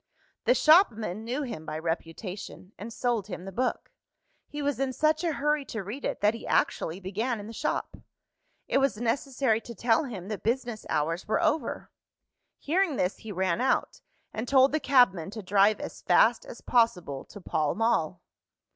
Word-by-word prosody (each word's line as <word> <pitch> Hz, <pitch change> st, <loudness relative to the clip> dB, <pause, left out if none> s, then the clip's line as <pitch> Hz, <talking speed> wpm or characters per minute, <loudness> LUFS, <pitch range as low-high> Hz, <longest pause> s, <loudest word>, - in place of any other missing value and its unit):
The 245 Hz, +2 st, +4 dB
shopman 225 Hz, -, +4 dB
knew 250 Hz, +6 st, -2 dB
him 230 Hz, -, -6 dB
by 155 Hz, 0 st, -5 dB
reputation, 175 Hz, +4 st, -5 dB
and 220 Hz, +3 st, -8 dB
sold 230 Hz, -4 st, -1 dB
him 180 Hz, -2 st, -7 dB
the 195 Hz, -, -6 dB
book. 250 Hz, -, -2 dB, 0.6 s
He 295 Hz, -, -7 dB
was 285 Hz, -2 st, -1 dB
in 270 Hz, -1 st, -1 dB
such 310 Hz, +4 st, +1 dB
a 335 Hz, -2 st, 0 dB
hurry 295 Hz, +1 st, 0 dB
to 220 Hz, -5 st, -5 dB
read 220 Hz, +9 st, -7 dB
it, -, -, -3 dB
that 210 Hz, +1 st, +4 dB
he 230 Hz, -, -8 dB
actually 165 Hz, +3 st, 0 dB
began 215 Hz, +5 st, -2 dB
in 205 Hz, -, -8 dB
the 225 Hz, -, -8 dB
shop. 295 Hz, +7 st, -2 dB, 0.7 s
It -, -, +2 dB
was 275 Hz, -5 st, +1 dB
necessary 240 Hz, 0 st, 0 dB
to 235 Hz, +1 st, -10 dB
tell 235 Hz, +7 st, +2 dB
him 195 Hz, -8 st, -7 dB
that 215 Hz, -, -4 dB
business 235 Hz, -1 st, -2 dB
hours 165 Hz, +4 st, -1 dB
were 215 Hz, -, +1 dB
over. 310 Hz, -6 st, -1 dB, 0.7 s
Hearing 340 Hz, 0 st, +1 dB
this, 180 Hz, -4 st, 0 dB
he 220 Hz, -, -9 dB
ran 190 Hz, +2 st, 0 dB
out, 260 Hz, -, 0 dB, 0.3 s
and 220 Hz, +3 st, -4 dB
told 265 Hz, +1 st, +5 dB
the 310 Hz, -, +1 dB
cabman 245 Hz, -, +3 dB
to 215 Hz, -2 st, -7 dB
drive 200 Hz, +2 st, +3 dB
as -, -, -7 dB
fast -, -, +3 dB
as -, -, -10 dB
possible 180 Hz, -, +1 dB
to 205 Hz, -, -12 dB
Pall 155 Hz, -5 st, -1 dB
Mall. 180 Hz, -6 st, 0 dB
225 Hz, 180 wpm, -28 LUFS, 195-270 Hz, 0.7 s, told